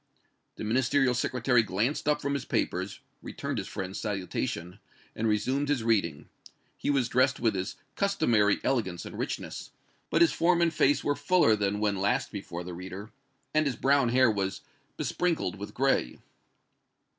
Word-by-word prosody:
The -, -, -7 dB
Ministerial 130 Hz, +3 st, +2 dB
Secretary 125 Hz, 0 st, +2 dB
glanced 115 Hz, +9 st, -1 dB
up 150 Hz, 0 st, +1 dB
from 140 Hz, 0 st, 0 dB
his 140 Hz, -, -2 dB
papers, -, -, -2 dB, 0.2 s
returned -, -, -4 dB
his -, -, -5 dB
friend's 95 Hz, +1 st, -5 dB
salutation 90 Hz, -4 st, -3 dB, 0.4 s
and 115 Hz, -, -1 dB
resumed 130 Hz, +7 st, 0 dB
his 140 Hz, -6 st, +1 dB
reading. 95 Hz, -10 st, 0 dB, 0.5 s
He -, -, -3 dB
was 135 Hz, -4 st, +2 dB
dressed 130 Hz, +1 st, +2 dB
with 115 Hz, -2 st, +2 dB
his 95 Hz, -1 st, -3 dB, 0.2 s
customary 120 Hz, -, +2 dB
elegance 95 Hz, -10 st, -1 dB
and -, -, -8 dB
richness, -, -, -4 dB, 0.4 s
but -, -, +2 dB
his 170 Hz, -, +3 dB
form 170 Hz, +1 st, +3 dB
and 170 Hz, -1 st, +2 dB
face 145 Hz, +2 st, +3 dB
were 145 Hz, -, +1 dB
fuller 175 Hz, -12 st, +3 dB
than 105 Hz, 0 st, -1 dB
when 105 Hz, -2 st, +1 dB
last 100 Hz, +2 st, 0 dB
before 90 Hz, -4 st, -6 dB
the 90 Hz, 0 st, -7 dB
reader, 95 Hz, +4 st, -8 dB, 0.4 s
and 155 Hz, -1 st, +3 dB
his 130 Hz, -, -1 dB
brown 135 Hz, -2 st, +3 dB
hair 125 Hz, -1 st, +4 dB
was 95 Hz, -2 st, -2 dB, 0.4 s
besprinkled 170 Hz, -, -1 dB
with 100 Hz, -, -7 dB
gray. 135 Hz, -, +1 dB
115 Hz, 160 wpm, -28 LUFS, 100-140 Hz, 0.5 s, hair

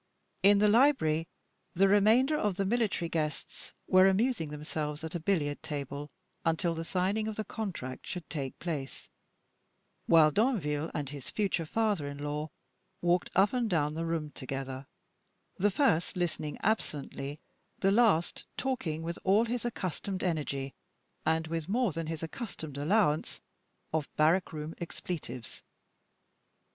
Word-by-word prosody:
In 200 Hz, +2 st, +7 dB
the 210 Hz, +1 st, +5 dB
library, 205 Hz, -, +4 dB, 0.5 s
the 195 Hz, +3 st, +5 dB
remainder 220 Hz, +9 st, +5 dB
of 210 Hz, -9 st, 0 dB
the 195 Hz, +1 st, 0 dB
military 210 Hz, -5 st, +1 dB
guests 155 Hz, -2 st, -4 dB
were 185 Hz, +1 st, +6 dB
amusing 195 Hz, -, +2 dB
themselves 150 Hz, 0 st, -4 dB
at 160 Hz, -, -5 dB
a 175 Hz, -, -2 dB
billiard 155 Hz, -4 st, 0 dB
table 145 Hz, 0 st, -5 dB, 0.3 s
until 165 Hz, +1 st, +1 dB
the 165 Hz, 0 st, -4 dB
signing 195 Hz, +5 st, 0 dB
of 220 Hz, -, -3 dB
the 215 Hz, -, -2 dB
contract 175 Hz, -, -5 dB
should 180 Hz, -3 st, -5 dB
take 140 Hz, -4 st, -4 dB
place, 150 Hz, -6 st, -5 dB, 1.0 s
while 160 Hz, -2 st, +7 dB
Danville 160 Hz, -, +1 dB
and 145 Hz, -3 st, -2 dB
his 140 Hz, -3 st, -8 dB
future 190 Hz, -6 st, -1 dB
father 210 Hz, -7 st, +1 dB
in 140 Hz, 0 st, -6 dB
law 150 Hz, +2 st, -3 dB, 0.5 s
walked 175 Hz, +1 st, +2 dB
up 195 Hz, +5 st, +4 dB
and 245 Hz, -3 st, +1 dB
down 150 Hz, -5 st, +1 dB
the 165 Hz, +1 st, -2 dB
room 160 Hz, -3 st, -2 dB
together, 135 Hz, 0 st, -5 dB, 0.7 s
the 205 Hz, +3 st, +3 dB
first 195 Hz, -, +2 dB
listening 160 Hz, -4 st, -2 dB
absently, 145 Hz, -8 st, -2 dB, 0.4 s
the 195 Hz, -, +3 dB
last 205 Hz, -6 st, +3 dB
talking 215 Hz, -13 st, -2 dB
with 170 Hz, +1 st, -4 dB
all 200 Hz, +4 st, +4 dB
his 240 Hz, +1 st, -2 dB
accustomed 190 Hz, -3 st, -3 dB
energy, 140 Hz, -6 st, -1 dB, 0.5 s
and 160 Hz, 0 st, +2 dB
with 165 Hz, +1 st, -3 dB
more 235 Hz, 0 st, +2 dB
than 165 Hz, 0 st, -4 dB
his 160 Hz, 0 st, -4 dB
accustomed 160 Hz, -, -6 dB
allowance 155 Hz, -1 st, +2 dB, 0.5 s
of 155 Hz, -3 st, 0 dB
barrack 165 Hz, +5 st, +3 dB
room 155 Hz, +1 st, -5 dB
expletives. 150 Hz, -, -6 dB
165 Hz, 140 wpm, -31 LUFS, 150-205 Hz, 1.0 s, In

